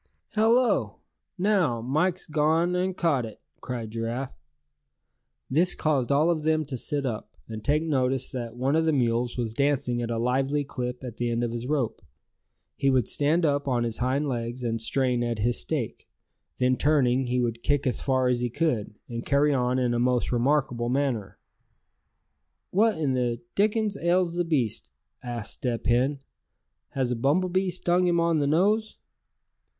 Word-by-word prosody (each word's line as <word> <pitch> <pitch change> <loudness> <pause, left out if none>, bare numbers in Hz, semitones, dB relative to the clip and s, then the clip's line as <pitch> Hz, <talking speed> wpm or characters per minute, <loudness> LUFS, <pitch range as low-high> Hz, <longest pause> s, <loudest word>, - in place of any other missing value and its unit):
"Hello! 230 +3 +3 0.4
now 180 - +2
Mike's 155 +10 0
gone 160 +3 +1
and 185 +1 -1
caught 150 -7 +2
it!" 110 -2 -8 0.2
cried 120 -3 -5
Giraffe. 115 +4 -4 1.1
This 170 +7 +2
caused 140 -5 0
all 150 +5 +4
of 160 -2 -1
them 155 0 +1
to 135 -1 -5
sit 140 +3 -2
up, 115 -4 -4 0.2
and 110 -1 -7
take 150 +2 +2
notice 130 -4 0
that 120 -3 -5
one 130 +4 0
of 160 0 +2
the 160 - +2
mules 120 -2 0
was 115 -3 -2
dancing 140 -2 0
at 120 - -3
a 115 - -1
lively 135 +5 +1
clip 125 -2 -5
at 120 -3 -7
the 120 0 -1
end 120 0 0
of 120 - -1
his 120 +1 -4
rope. 140 -6 -1 0.7
He 135 - +1
would 130 -4 +2
stand 160 +4 +2
up 145 -1 0
on 125 -3 +1
his 115 -1 -3
hind 130 +4 0
legs, 120 -1 -3
and 115 -1 -1
strain 125 +1 +1
at 120 -1 -1
his 120 +3 +1
stake; - - -4 0.5
then 130 0 +2
turning, 135 -4 +2
he 125 +1 0
would 120 -1 -1
kick 145 +3 +1
as 125 - -1
far 130 -2 +1
as 125 -1 +1
he 120 - 0
could; 120 -7 -1
and 115 0 -5
carry 145 +1 +3
on 125 -1 +1
in 125 -2 +1
a 120 - 0
most 125 0 +1
remarkable 125 -1 +1
manner. 125 -6 -1 1.3
"What 215 +1 +3
in 145 -4 0
the 120 -2 0
dickens 210 0 +1
ails 175 0 +1
the 175 0 0
beast?" 115 - -1 0.3
asked 120 -3 -5
Step 120 -3 -3
Hen. 130 +4 +2 0.7
"Has 130 -2 0
a - - +1
bumble 145 +10 +1
bee 185 +1 +1
stung 180 0 +1
him 170 -1 +2
on 170 -2 +2
the 145 - +1
nose?" 210 +8 +2
130 Hz, 175 wpm, -26 LUFS, 120-155 Hz, 1.3 s, all